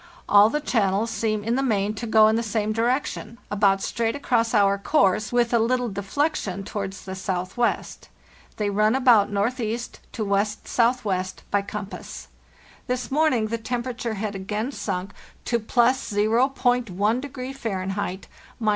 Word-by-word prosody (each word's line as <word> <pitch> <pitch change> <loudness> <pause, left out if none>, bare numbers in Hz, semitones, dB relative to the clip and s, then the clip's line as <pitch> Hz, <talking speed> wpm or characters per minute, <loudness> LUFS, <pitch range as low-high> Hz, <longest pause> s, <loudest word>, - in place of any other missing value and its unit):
All 205 +1 +7
the 300 - -1
channels 220 -4 +1
seem 215 -1 -1
in 230 +2 0
the 265 - +1
main 210 -5 +1
to 230 +2 -5
go 220 -1 +6
in 220 - +3
the 230 - +1
same 215 -1 -1
direction—about 225 -4 0
straight 230 -1 -1
across 235 -5 +1
our 200 -1 +4
course, 200 -3 +2
with 240 -1 +2
a 235 - +5
little 245 +1 +1
deflection 200 - -2
towards 195 -1 -5
the 190 - -5
southwest. 190 +4 -2 0.5
They 205 -1 0
run 215 +3 +3
about 245 -7 +5
northeast 230 +3 -2
to 220 - -2
west 200 +1 -1
southwest 215 -6 0
(by 205 - +3
compass). 200 0 -7 0.6
This 250 0 -2
morning 265 -7 +2
the 230 +1 -2
temperature 240 -1 -3
had 205 0 -3
again 210 +6 -3
sunk 195 -6 -4 0.3
to 235 - +1
+0.1° 245 +1 +1
Fahr. 200 -8 -3
(—17. 195 -1 -3
220 Hz, 140 wpm, -24 LUFS, 200-245 Hz, 0.6 s, All